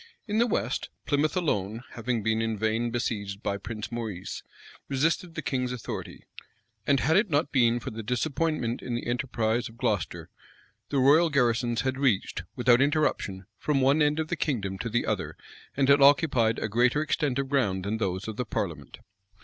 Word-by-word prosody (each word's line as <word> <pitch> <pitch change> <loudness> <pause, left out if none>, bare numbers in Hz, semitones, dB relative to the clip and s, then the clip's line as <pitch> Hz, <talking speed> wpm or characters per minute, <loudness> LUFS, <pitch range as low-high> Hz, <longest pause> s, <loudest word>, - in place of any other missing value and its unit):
In 210 +1 0
the 240 - +4
west, 215 - -1 0.2
Plymouth 150 +4 +1
alone, 110 - -1
having 120 -1 -2
been 110 +1 +1
in 115 -1 -1
vain 110 +3 0
besieged 105 -4 -3
by 100 - -1
Prince 105 +1 -6
Maurice, 110 -6 -5 0.5
resisted 165 +5 0
the 155 - -4
king's 125 -2 -1
authority; 125 -3 -6 0.6
and 140 -2 +3
had 155 +5 +2
it 210 +1 +3
not 145 -1 +1
been 120 -3 +3
for - - -6
the 115 0 -6
disappointment 125 +1 -1
in 120 - -3
the 120 - -4
enterprise 120 -2 -1
of 115 - -16
Gloucester, 105 - -2 0.6
the 140 - -1
royal 145 +6 +5
garrisons 120 -4 +1
had 130 0 -2
reached, 115 -8 +1
without 125 0 +4
interruption, 140 - 0
from 150 -2 +1
one 135 +4 +3
end 150 +1 +2
of 160 0 -2
the - - 0
kingdom 100 -10 -2
to 115 - -3
the 120 +2 0
other, - - -2 0.4
and 135 -1 +3
had 140 +1 +6
occupied 135 -5 +4
a - - -2
greater 120 +7 +2
extent 150 -4 0
of 135 -1 -2
ground 100 -10 +1
than 105 +2 -1
those 95 -1 -2
of 110 -1 -5
the 125 - -1
parliament. - - -4
125 Hz, 180 wpm, -27 LUFS, 110-145 Hz, 0.6 s, had